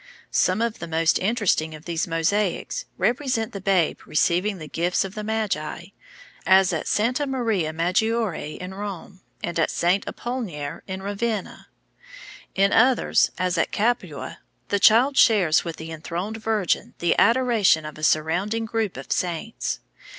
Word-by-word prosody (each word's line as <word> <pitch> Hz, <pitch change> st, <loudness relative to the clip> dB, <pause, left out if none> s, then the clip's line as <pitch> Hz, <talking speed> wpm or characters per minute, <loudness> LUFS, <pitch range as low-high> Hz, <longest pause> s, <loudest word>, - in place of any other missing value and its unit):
Some 185 Hz, +5 st, +2 dB
of 235 Hz, -1 st, -2 dB
the 170 Hz, -, -6 dB
most 165 Hz, 0 st, +2 dB
interesting 190 Hz, -7 st, 0 dB
of 155 Hz, -, -13 dB
these 170 Hz, -1 st, -2 dB
mosaics 190 Hz, -, -1 dB
represent 245 Hz, -3 st, 0 dB
the 195 Hz, -, -6 dB
Babe 185 Hz, -4 st, +1 dB
receiving 180 Hz, +6 st, +1 dB
the 155 Hz, -3 st, -8 dB
gifts 175 Hz, +5 st, 0 dB
of 195 Hz, -, -7 dB
the 215 Hz, -1 st, -5 dB
Magi, 200 Hz, -6 st, -3 dB, 0.5 s
as 190 Hz, -1 st, +5 dB
at -, -, -3 dB
Santa 250 Hz, +7 st, +1 dB
Maria 225 Hz, -11 st, 0 dB
Maggiore 180 Hz, 0 st, -1 dB
in 180 Hz, +1 st, -7 dB
Rome 195 Hz, -1 st, -7 dB, 0.2 s
and 170 Hz, -1 st, -2 dB
at 160 Hz, -, +2 dB
Saint 180 Hz, +3 st, +1 dB
Apollinare 195 Hz, -, -5 dB
in 190 Hz, 0 st, -5 dB
Ravenna. 205 Hz, +1 st, -3 dB, 0.9 s
In 195 Hz, +1 st, +3 dB
others, 250 Hz, +2 st, +4 dB
as 180 Hz, -2 st, 0 dB
at -, -, 0 dB
Capua, 240 Hz, +4 st, -2 dB, 0.3 s
the 200 Hz, -, +1 dB
Child 240 Hz, +8 st, +5 dB
shares 190 Hz, -9 st, +5 dB
with 165 Hz, -2 st, -5 dB
the 160 Hz, +1 st, -8 dB
enthroned 175 Hz, +7 st, -5 dB
Virgin 215 Hz, -4 st, -1 dB
the 170 Hz, -, +1 dB
adoration 230 Hz, -8 st, +3 dB
of 150 Hz, -, -7 dB
a -, -, -10 dB
surrounding 180 Hz, +9 st, +1 dB
group 220 Hz, -, -2 dB
of 135 Hz, -, -9 dB
saints. 180 Hz, +5 st, -2 dB
195 Hz, 150 wpm, -24 LUFS, 170-225 Hz, 0.9 s, as